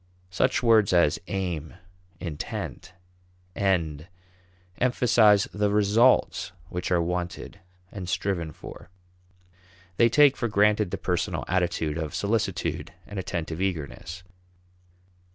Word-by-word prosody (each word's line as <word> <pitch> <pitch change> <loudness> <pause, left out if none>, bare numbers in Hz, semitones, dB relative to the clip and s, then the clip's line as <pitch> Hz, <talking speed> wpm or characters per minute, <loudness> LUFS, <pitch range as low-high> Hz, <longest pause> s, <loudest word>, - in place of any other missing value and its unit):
Such 90 - +1
words 110 -5 +4
as 85 -4 +3
aim, 90 -4 -3 0.4
intent, 85 +2 -6 0.6
end, 85 -6 0 0.7
emphasize 115 -5 +4
the 105 0 +1
results 105 -2 +3 0.2
which 90 0 -4
are 90 - +4
wanted 90 +1 -4 0.3
and 95 -3 -6
striven 90 -4 -2
for; 75 - -11 1.1
they 115 - +5
take 145 +3 +5
for 120 - -1
granted 105 -1 +2
the - - -3
personal 90 -2 -2
attitude 85 -3 -1
of 80 -2 -4
solicitude 95 -6 -1
and 105 -2 -6
attentive 85 -2 -4
eagerness. 90 0 -4
95 Hz, 105 wpm, -26 LUFS, 85-105 Hz, 1.1 s, they